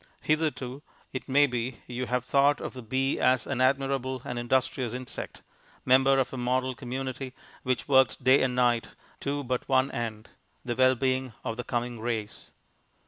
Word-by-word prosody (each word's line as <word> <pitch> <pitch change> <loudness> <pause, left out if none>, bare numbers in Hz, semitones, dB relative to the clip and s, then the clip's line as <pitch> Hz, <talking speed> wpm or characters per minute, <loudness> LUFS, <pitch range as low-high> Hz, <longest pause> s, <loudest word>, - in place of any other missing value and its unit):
Hitherto, 150 -4 -1 0.3
it 130 - -5
may 145 +2 +6
be, 125 -2 -3
you 125 0 -4
have 125 0 -1
thought 140 +2 +3
of - - -5
the 130 - -8
bee 130 +4 0
as 130 -1 +3
an 130 -2 -2
admirable 130 -1 +1
and 125 - -3
industrious 125 0 0
insect, 125 0 -7 0.4
member 135 +1 +5
of 135 -1 0
a - - -4
model 130 +1 0
community 130 +1 -5 0.3
which 130 0 -1
worked 130 -4 +4
day 130 +2 +6
and 125 -1 +1
night 120 -2 +2 0.3
to 145 +1 -2
but 125 +1 -3
one 130 0 +3
end 110 -2 -4 0.4
the 120 -1 -2
well 130 +1 +5
being 130 -1 0
of 115 - -3
the 125 - -4
coming 120 -1 -3
race. 110 -2 -4
130 Hz, 170 wpm, -28 LUFS, 120-135 Hz, 0.4 s, may